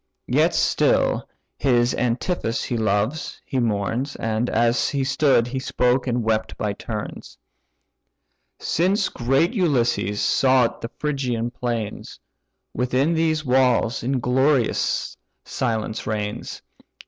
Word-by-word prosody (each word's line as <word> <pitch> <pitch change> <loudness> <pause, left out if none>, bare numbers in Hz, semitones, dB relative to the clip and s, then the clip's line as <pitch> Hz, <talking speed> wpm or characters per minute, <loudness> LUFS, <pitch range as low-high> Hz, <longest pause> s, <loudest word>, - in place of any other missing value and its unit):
Yet - - +2
still - - +2 0.3
his 120 -2 +2
Antiphus 120 0 -1
he 120 - -3
loves, 110 +6 -1
he 130 - -2
mourns, 115 +4 -1
And, 115 +2 -1
as 120 +1 +2
he 140 -2 -1
stood, 135 -3 +3
he 130 +2 -4
spoke 125 0 +1
and 120 -1 0
wept 110 0 -1
by 105 -1 -1
turns, 105 +1 -7 1.2
"Since 190 +4 +1
great 135 - +1
Ulysses 120 - +1
sought 130 -3 +2
the 115 - -5
Phrygian 125 -6 -2
plains, 120 -4 -4 0.5
Within 130 +6 +1
these 160 -1 0
walls 125 -2 +2
inglorious 130 +1 +1 0.3
silence 110 -3 -2
reigns. 105 -1 -4
125 Hz, 110 wpm, -23 LUFS, 115-135 Hz, 1.2 s, stood